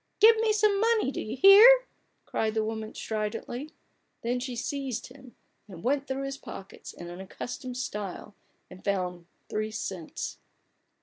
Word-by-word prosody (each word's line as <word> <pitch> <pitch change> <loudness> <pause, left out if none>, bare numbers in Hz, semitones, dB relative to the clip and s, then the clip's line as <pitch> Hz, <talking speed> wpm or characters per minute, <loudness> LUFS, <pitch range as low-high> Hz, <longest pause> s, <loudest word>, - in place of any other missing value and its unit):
"Give 450 +2 +8
me 445 0 +2
some 420 -1 +3
money: 450 -10 +2
do - - -4
you 225 +4 -5
hear!" 455 - +9 0.4
cried 220 0 -1
the 220 - +2
woman, 220 0 -5
stridently. 225 +6 -4 0.5
Then 245 +2 0
she 250 0 -4
seized 265 0 -3
him, 255 -2 -15 0.3
and 180 -5 -11
went 275 +2 +1
through 265 +1 -2
his 275 0 -5
pockets 195 - -9
in 175 - -10
an 175 +2 -8
accustomed 245 +5 -6
style, 210 -5 -5 0.3
and 185 - -14
found 180 -3 -2 0.2
three 215 0 -2
cents. 190 -6 -5
245 Hz, 150 wpm, -28 LUFS, 210-280 Hz, 0.5 s, hear